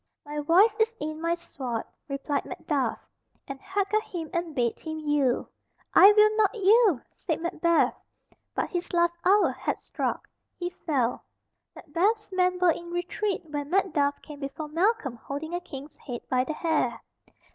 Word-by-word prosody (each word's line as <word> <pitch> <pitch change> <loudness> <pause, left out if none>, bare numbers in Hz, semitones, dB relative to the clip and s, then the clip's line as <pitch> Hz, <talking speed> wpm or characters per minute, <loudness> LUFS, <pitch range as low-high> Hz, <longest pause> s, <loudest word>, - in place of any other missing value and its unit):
"My 295 0 -4
voice 350 +9 +5
is 455 0 +1
in 310 +1 -4
my 335 0 +1
sword," 260 -9 -5 0.2
replied 280 0 -2
Macduff, 270 -7 -1 0.5
and 275 -1 -7
hacked 395 +1 -2
at 430 - +4
him 335 -6 -6
and 340 -3 -2
bade 240 -3 0
him 315 -1 -5
yield. 295 -4 +1 0.5
"I 395 - +9
will 425 +1 +5
not 430 +1 +3
yield!" 410 - +4
said 320 - -2
Macbeth, 335 0 +2 0.6
but - - -1
his 350 -1 -3
last 345 0 +2
hour 400 +3 +5
had - - -3
struck. - - -3 0.3
He 350 0 -3
fell. 270 -9 -1 0.5
Macbeth's 395 +7 0
men 365 -1 +2
were 360 -1 +4
in 345 +2 -6
retreat 355 +3 -2
when 290 -2 -4
Macduff 305 -6 +1
came 295 -2 -10
before 290 +2 -5
Malcolm 330 - +1
holding 285 +7 -6
a 350 - 0
King's 290 -4 -9
head 245 -4 -6
by 255 0 +1
the 310 - -3
hair. 305 -7 0
335 Hz, 160 wpm, -27 LUFS, 290-370 Hz, 0.6 s, I